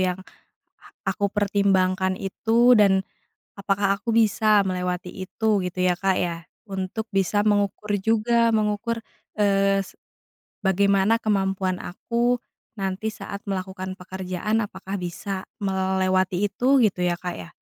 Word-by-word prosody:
yang 185 -1 0 0.9
aku 200 -1 0
pertimbangkan 190 -2 +1
itu, 230 +5 +3
dan 190 -2 +4 0.5
apakah 195 0 +1
aku 230 +2 -2
bisa 215 -2 +4
melewati 180 -1 -2 0.2
itu 220 +3 -1
gitu 180 0 -5
ya, 180 -1 +3
Kak, 190 -1 +1
ya? 175 -2 -1 0.3
Untuk 195 +3 -3
bisa 195 0 +1
mengukur 205 0 +1
juga, 230 +3 +2
mengukur, 215 +2 0 0.4
eee, 195 -1 +3
se 195 - -14 0.7
bagaimana 200 +3 +3
kemampuan 195 -3 0
aku 235 +6 -1 0.4
nanti 195 +3 -2
saat 200 -1 -8
melakukan 190 -1 -4
pekerjaan 190 +4 -2
apakah 195 0 -6
bisa 190 +2 -5 0.2
melewati 190 0 +1
itu 260 +6 +3
gitu 195 -5 +1
ya, 175 -1 +2
Kak, 180 -1 -4
ya? 85 - -10
195 Hz, 120 wpm, -24 LUFS, 185-210 Hz, 0.9 s, dan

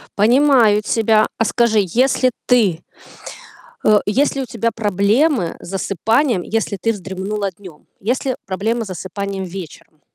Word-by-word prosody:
Понимаю 235 -1 +4
тебя. 220 0 +2
А 225 - +1
скажи, 230 -1 +2
если 255 +6 +2
ты 210 -10 +2 1.0
э, 215 - +6
есть 275 +7 +1
у 270 - -2
тебя 230 0 -2
проблемы 210 - +1
с - - -12
засыпанием, 210 - 0
если 215 0 -2
ты 225 +5 0
вздремнула 195 0 -4
днём, 180 -4 -15
есть 245 +8 -2
ли 260 -2 0
проблемы 220 +5 -2
с - - -10
засыпанием 195 +1 -5
вечером? 175 -4 -10
215 Hz, 135 wpm, -18 LUFS, 195-235 Hz, 1.0 s, э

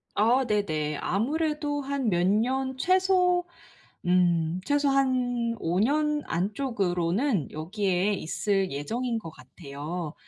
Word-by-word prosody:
아 245 +5 +3
네네. 155 -9 -1
아무래도 295 - -1
한 275 -4 -1
몇 175 -1 +1
년 260 +6 +1
최소 365 +1 +3 0.6
음 175 -1 +2
최소 290 -1 +2
한 250 -3 +1
5 175 +3 0
년 300 +5 +1
안쪽으로는 195 - -1
여기에 185 +4 0
있을 195 +1 -1
예정인 230 - -2
것 165 -7 -8
같아요. 150 +4 -7
215 Hz, 200 characters per minute, -27 LUFS, 175-275 Hz, 0.6 s, 아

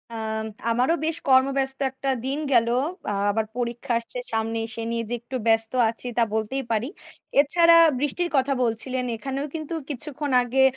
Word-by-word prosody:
আম 220 0 -3 0.3
আমারও 250 +8 +2
বেশ 325 +1 -1
কর্মব্যস্ত 265 +1 +3
একটা 265 +1 -4 0.2
দিন 275 +3 -1
গেল। 230 -1 +4 0.4
আ - - -1 0.2
আবার 220 +1 -1
পরীক্ষা 240 +1 -2
আসছে 235 +2 -9 0.2
সামনে, 225 +1 -1
সে 230 - -5
নিয়ে 230 0 -1
যে - - -2
একটু 255 +2 -8
ব্যস্ত 225 0 +3 0.2
আছি 230 +2 -6
তা 235 - +5
বলতেই 220 +5 -1
পারি। 225 +3 0 0.5
এছাড়া 335 +3 +6 0.2
বৃষ্টির 295 +5 -1
কথা 270 +1 +2
বলছিলেন; 250 +2 -1
এখানেও 270 +4 -4
কিন্তু 310 0 -5 0.2
কিছুক্ষণ 290 +1 -2
আগে 260 +2 +2
255 Hz, 160 wpm, -24 LUFS, 230-275 Hz, 0.5 s, এছাড়া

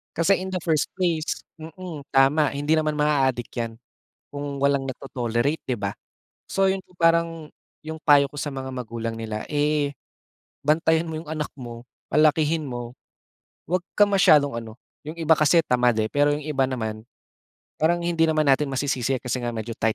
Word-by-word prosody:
Kasi 170 +5 +3
in 185 - -5
the 185 - -1
first 160 -3 +1
place 170 -4 -1 0.2
mm, 165 -1 -8
tama, 135 +3 +4
hindi 145 +3 +1
naman 155 -1 0
maa-adik 135 -5 +1
'yan 115 -1 -4 0.5
kung 145 -1 -5
walang 140 -1 +2
nagto-tolerate, 125 +2 -2
'di 125 - 0
ba? 100 0 -2 0.6
So 195 0 +2
'yon 190 0 -1
po 180 - -25
parang 165 -2 +2 0.4
'yong 160 0 -5
payo 145 -3 +5
ko 145 - -12
sa 145 - -2
mga 130 0 -5
magulang 115 -2 -5
nila, 110 -1 -4
eh, 145 -1 +1 0.7
bantayan 160 +1 +3
mo 160 - -4
'yong 155 -1 -9
anak 155 -1 -3
mo, 120 -2 -9 0.2
palakihin 155 0 +3
mo, 120 -1 -5 0.8
huwag 180 +1 +1 0.2
ka 205 - +7
masyadong 155 -8 +4
ano, 110 -1 -10 0.3
'yong 155 +2 -7
iba 160 0 +4
kasi 155 +2 +5
tamad, 125 -2 +2
eh, 110 - 0
pero 145 0 +3
'yong 145 0 -3
iba 140 -3 +1
naman 110 -3 -4 0.7
parang 170 +2 +2
hindi 170 -1 +2
naman 155 -1 +2
natin 140 +1 +3
masisisi 135 -2 -1
kasi 125 0 -2
nga 120 -1 -3
medyo 110 +1 -5
tight 110 0 +1
145 Hz, 170 wpm, -24 LUFS, 125-160 Hz, 0.8 s, ka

